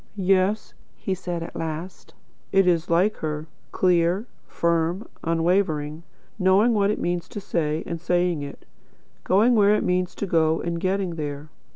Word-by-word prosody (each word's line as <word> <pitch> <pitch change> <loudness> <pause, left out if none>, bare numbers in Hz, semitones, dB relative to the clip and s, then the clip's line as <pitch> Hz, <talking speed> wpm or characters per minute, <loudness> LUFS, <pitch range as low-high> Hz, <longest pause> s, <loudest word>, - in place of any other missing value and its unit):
"Yes," 195 +1 +1 0.2
he 190 - -3
said, 175 -2 -4
at - - -9
last, 165 +3 -6 0.4
"it 195 0 +4
is 170 -2 +1
like 185 +6 +2
her, 155 -1 -3 0.3
clear, 180 +3 +2 0.2
firm, 170 +4 0 0.2
unwavering; 165 -2 0 0.4
knowing 195 +5 +4
what 200 -2 +2
it 210 - 0
means 175 0 -2
to - - -6
say, 160 -5 -1
and 170 -1 -5
saying 175 -2 +1
it; 140 0 -8 0.6
going 215 +7 +4
where 210 -2 +5
it - - 0
means 180 0 0
to - - -3
go, 160 -3 +2
and 170 0 -3
getting 185 -2 -1
there. 145 0 -5
175 Hz, 155 wpm, -24 LUFS, 165-195 Hz, 0.6 s, where